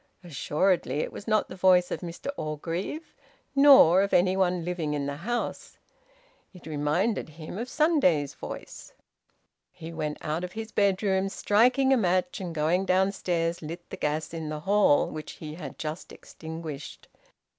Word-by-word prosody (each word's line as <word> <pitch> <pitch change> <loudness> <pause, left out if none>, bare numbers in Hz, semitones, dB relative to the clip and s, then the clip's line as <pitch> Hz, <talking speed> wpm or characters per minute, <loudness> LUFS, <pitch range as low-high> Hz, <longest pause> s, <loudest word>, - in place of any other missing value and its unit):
Assuredly 155 -2 0
it - - -4
was 205 - -9
not 215 -1 +2
the - - -9
voice 180 -1 +4
of - - -2
Mr 175 +10 -6
Orgreave, 165 - -4 0.4
nor 270 - +8
of 200 - +1
any 185 +1 +3
one 180 -3 +1
living 165 -4 -2
in 145 -1 -2
the 140 0 -4
house. 240 +9 -4 0.8
It 180 - -14
reminded 150 +7 -1
him 155 +5 -8
of 240 - -4
the - - -12
Sunday's 225 - +2
voice. - - -9 0.8
He 165 +1 -9
went 155 -2 -3
out 155 +3 -2
of 180 - -6
his 225 0 -6
bedroom, 195 -1 +1
striking 250 +7 +3
a - - +4
match, 185 -3 0
and 175 -3 -5
going 170 +5 +1
downstairs 180 -3 0
lit 170 +2 -8
the - - -4
gas 155 +2 -2
in 160 -2 -4
the 150 0 -5
hall, 200 -4 +3
which 155 0 -7
he 155 -1 -8
had 155 -5 -8
just 155 +3 -6
extinguished. 160 -3 -9
175 Hz, 160 wpm, -27 LUFS, 155-195 Hz, 0.8 s, nor